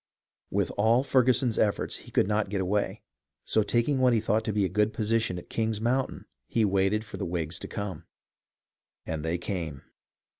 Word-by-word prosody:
With - - 0
all 115 +5 +4
Ferguson's 130 -3 +3
efforts, 105 -2 +1
he - - -13
could - - +3
not 105 -1 0
get 100 -1 -1
away; 100 +2 -1 0.4
so, 110 - +3
tak 120 +3 +1
ing 145 -3 +1
what 130 -1 +4
he 115 - +3
thought 110 +1 +1
to 110 - 0
be 105 -1 +1
a - - +2
good 105 +3 +1
position 110 -3 0
at 90 - -9
King's 110 -2 -1
Moun 125 +4 +1
tain, - - -10 0.2
he 115 -2 +2
waited 100 +2 +1
for - - -8
the - - -4
Whigs 85 -1 -2
to - - -6
come. 100 -3 -5 1.0
And 80 -2 -3
they 80 +2 0
came. 85 -6 -4
105 Hz, 195 wpm, -28 LUFS, 95-115 Hz, 1.0 s, all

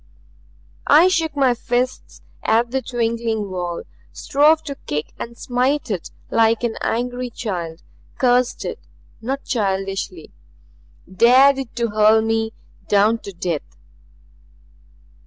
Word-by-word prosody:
I 320 +6 +7
shook 325 -4 0
my 265 -3 +3
fists 245 +2 -3 0.2
at 230 +2 +2
the 265 +1 0
twinkling 230 -4 -2
wall, 175 -2 -4 0.3
strove 300 - +3
to 285 - -5
kick 150 +1 -3
and 235 0 -7
smite 255 +1 0
it 185 -5 -3 0.2
like 225 0 +3
an 235 -2 -1
angry 245 +2 -2
child, 175 -8 -5 0.3
cursed 250 -1 +2
it - - -4 0.4
not 270 +4 -3
childishly. 195 - -2 0.8
Dared 255 +8 +5
it 260 -4 -7
to 235 -1 0
hurl 215 +1 +4
me 225 0 0 0.4
down 210 +3 +3
to 200 - -9
death. 170 -4 -4
235 Hz, 120 wpm, -21 LUFS, 210-255 Hz, 0.8 s, I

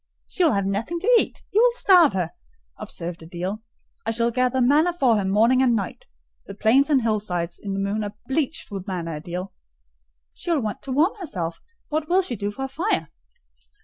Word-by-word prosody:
"She 370 - -1
will 320 - +4
have 200 -1 0
nothing 215 - -2
to 485 +5 +4
eat: - - -3
you 425 - +4
will - - +5
starve 360 - +6
her," 180 -3 -1 0.4
observed 170 0 -6
Adèle. 180 +6 -5 0.4
"I - - -3
shall 230 +1 +1
gather 255 +2 +1
manna 295 +8 +4
for 265 -9 +3
her 205 - +1
morning 225 +7 +4
and 245 -3 +4
night: 200 -4 -4 0.4
the 200 - -8
plains 255 +8 +3
and 270 -5 +3
hillsides 190 -6 -1
in 200 -1 -4
the - - -2
moon 200 +2 -1
are 205 0 -6
bleached 280 -2 -2
with 195 0 -6
manna, 165 -5 -4
Adèle." 180 +3 -5 0.8
"She - - -7
will 325 -5 +2
want 210 -1 -4
to 275 - -6
warm 310 +9 +3
herself: 175 - -4 0.3
what 310 0 -2
will 375 +2 +4
she 250 - -3
do 205 -1 -3
for 235 +6 -6
a - - -3
fire?" 335 +11 -1
225 Hz, 200 wpm, -23 LUFS, 195-295 Hz, 0.8 s, starve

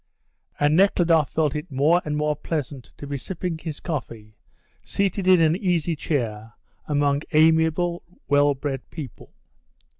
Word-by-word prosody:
And 145 +1 +3
Nekhludoff 170 -5 +3
felt 155 -2 0
it 150 - -5
more 150 +6 +3
and 150 0 -3
more 150 0 0
pleasant 145 -4 -4
to - - -8
be 140 0 -4
sipping 175 +2 -4
his 160 -2 -6
coffee 115 - -6 0.5
seated 195 -1 -1
in 185 -1 +6
an 160 0 +3
easy 175 -4 0
chair 115 -8 -3 0.3
among 145 -1 +1
amiable, 160 +2 +3 0.3
well 145 0 +3
bred 135 -1 -5
people. 150 -6 -9
150 Hz, 140 wpm, -23 LUFS, 140-165 Hz, 0.5 s, in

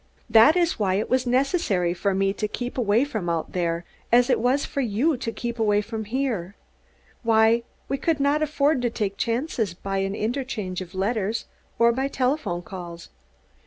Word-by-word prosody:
This 230 +9 +7
is 345 -6 +1
why 190 -3 +1
it 210 - -2
was 255 0 +2
necessary 250 - +1
for 190 +2 -1
me 195 0 +1
to 210 +1 -2
keep 245 +3 -5
away 230 +1 +2
from 220 -11 -3
out 165 -1 -2
there 170 -1 -1 0.3
as 245 +2 +5
it - - +3
was 255 +5 +1
for 280 - -2
you 250 +7 +1
to 235 -2 -3
keep 235 0 -5
away 210 -2 +3
from 220 +1 -5
here; 220 -6 -2 0.7
why 225 0 +4 0.3
we 275 - -2
could 325 -3 0
not 285 +2 +2
afford 295 -2 +2
to 245 - +1
take 205 -3 -2
chances 230 - -1
by 195 +2 -3
an 195 +1 -1
interchange 220 -6 -3
of 185 +1 -9
letters 210 +2 -1 0.3
or 235 0 +5
by 265 +3 -1
telephone 255 - -1
calls. 175 -2 -9
225 Hz, 180 wpm, -24 LUFS, 195-260 Hz, 0.7 s, This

